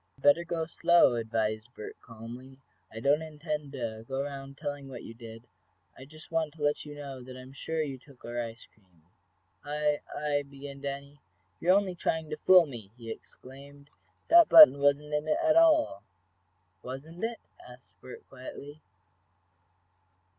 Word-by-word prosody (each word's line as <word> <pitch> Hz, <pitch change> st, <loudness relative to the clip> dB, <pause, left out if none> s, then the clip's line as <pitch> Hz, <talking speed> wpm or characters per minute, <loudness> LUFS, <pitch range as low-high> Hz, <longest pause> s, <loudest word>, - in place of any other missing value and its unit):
"Better 145 Hz, +5 st, +4 dB
go 170 Hz, -1 st, -2 dB
slow," 170 Hz, -3 st, +4 dB
advised 110 Hz, 0 st, -2 dB
Bert, 105 Hz, -, -8 dB
calmly. 120 Hz, +3 st, -11 dB, 0.3 s
"I 110 Hz, -, -7 dB
don't 140 Hz, +6 st, +3 dB
intend 150 Hz, -2 st, -5 dB
to 115 Hz, -4 st, -5 dB
go 135 Hz, -, -5 dB
around 140 Hz, -1 st, -6 dB
telling 145 Hz, -1 st, -5 dB
what 125 Hz, -3 st, -8 dB
you 115 Hz, -, -9 dB
did. 115 Hz, 0 st, -11 dB, 0.5 s
I 130 Hz, -, -12 dB
just 155 Hz, +3 st, -14 dB
want 160 Hz, -2 st, -1 dB
to 150 Hz, -, -7 dB
let 145 Hz, +1 st, 0 dB
you 145 Hz, -, -8 dB
know 140 Hz, -3 st, -8 dB
that 130 Hz, +1 st, -10 dB
I -, -, -9 dB
am 130 Hz, +1 st, -13 dB
sure 160 Hz, +3 st, -2 dB
you 135 Hz, -3 st, -6 dB
took 135 Hz, -1 st, -17 dB
our 120 Hz, +1 st, -3 dB
ice 115 Hz, 0 st, -8 dB
cream. 90 Hz, -6 st, -31 dB, 0.6 s
"I 150 Hz, 0 st, 0 dB
I" 145 Hz, -1 st, -1 dB
began 140 Hz, 0 st, -10 dB
Danny. 140 Hz, +1 st, -6 dB, 0.4 s
"You're 180 Hz, +3 st, +4 dB
only 200 Hz, -2 st, -1 dB
trying 160 Hz, -2 st, -2 dB
to 155 Hz, -, -3 dB
fool 180 Hz, +2 st, +6 dB
me!" 120 Hz, -9 st, -9 dB
he 115 Hz, -2 st, -7 dB
exclaimed. 140 Hz, +4 st, -13 dB, 0.4 s
"That 340 Hz, 0 st, +7 dB
button 305 Hz, -, +10 dB
wasn't 145 Hz, +1 st, +1 dB
in 150 Hz, +1 st, -1 dB
it 155 Hz, -, +2 dB
at 320 Hz, -2 st, +3 dB
all!" 315 Hz, -, +4 dB, 0.8 s
"Wasn't 150 Hz, +9 st, -8 dB
it?" 230 Hz, 0 st, -2 dB, 0.3 s
asked 125 Hz, 0 st, -16 dB
Bert, 130 Hz, -, -11 dB
quietly. 140 Hz, +3 st, -10 dB
140 Hz, 165 wpm, -29 LUFS, 125-155 Hz, 0.8 s, button